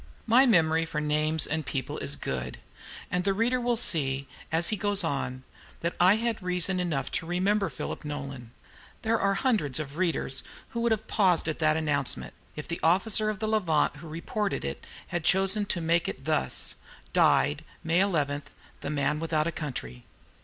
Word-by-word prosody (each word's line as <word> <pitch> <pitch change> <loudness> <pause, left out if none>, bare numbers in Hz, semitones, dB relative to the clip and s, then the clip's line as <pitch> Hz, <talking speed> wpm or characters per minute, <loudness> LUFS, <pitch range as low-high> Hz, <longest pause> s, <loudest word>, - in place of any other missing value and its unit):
My 250 +4 +6
memory 165 -6 +4
for 160 -2 -3
names 155 +1 +1
and 155 +1 -2
people 135 -4 -4
is - - -3
good, 65 -1 -4 0.5
and 180 0 0
the 195 0 +1
reader 245 +4 +1
will 240 -1 +1
see, 140 - +2 0.2
as 165 +1 +2
he 215 - +1
goes 205 -1 +1
on, 130 -4 -2 0.4
that 170 +1 -1
I 185 +3 +6
had 230 -1 -1
reason 180 +1 0
enough 155 -7 -2
to 165 - -3
remember 195 +3 +1
Philip - - -6
Nolan. 140 -5 -6 0.5
There 225 0 +2
are 195 0 +2
hundreds 195 - +1
of 150 0 -6
readers 170 -7 0 0.3
who 235 - -3
would 235 0 +2
have 220 0 0
paused 185 -6 +2
at 155 - -2
that 155 -1 +3
announcement, 145 -4 -1 0.2
if 150 - -6
the 170 +2 -4
officer 205 +5 +3
of 215 - -2
the 215 +1 -2
"Levant" 180 -9 +1
who 165 - -10
reported 170 - -3
it 70 - -5 0.2
had 175 -2 -2
chosen 195 +4 +3
to 180 - 0
make 170 +1 +2
it - - -6
thus: 65 - 0 0.4
"Died, - - +3 0.2
May 165 +2 +2
11, 150 -7 +1 0.4
THE - - -5
MAN 150 0 0
WITHOUT 160 -1 0
A 170 - 0
COUNTRY." 90 - -6
170 Hz, 180 wpm, -28 LUFS, 150-200 Hz, 0.5 s, My